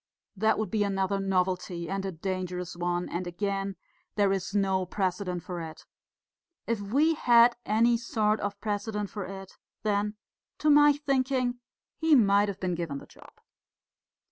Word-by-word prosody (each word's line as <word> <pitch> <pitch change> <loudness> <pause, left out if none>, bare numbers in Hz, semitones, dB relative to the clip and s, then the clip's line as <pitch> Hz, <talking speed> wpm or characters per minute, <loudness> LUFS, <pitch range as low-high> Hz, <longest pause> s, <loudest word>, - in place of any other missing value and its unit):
That 220 +3 +2
would 215 -4 -2
be 215 -2 +2
another 195 0 0
novelty 185 -2 -1
and 195 +1 -2
a - - -3
dangerous 180 0 -4
one; 175 0 -1
and 175 +1 -4
again, 195 +2 -2 0.4
there 200 -2 +3
is 195 +1 -3
no 190 -2 +2
precedent 185 -1 -2
for 175 -2 -5
it. 160 -1 -9 0.8
If 230 -3 -1
we 280 +11 +2
had 240 -4 +5
any 230 +3 +3
sort 220 -2 0
of 205 0 -4
precedent 210 -1 -3
for 205 -3 -5
it, 195 0 -9 0.3
then, 210 0 0 0.4
to 305 - +3
my 295 0 +7
thinking, 260 -3 0 0.4
he 320 -1 +5
might 205 -4 +4
have 200 -2 -5
been 185 -1 -1
given 165 -5 -3
the - - -10
job." - - -17
200 Hz, 155 wpm, -28 LUFS, 185-220 Hz, 0.8 s, my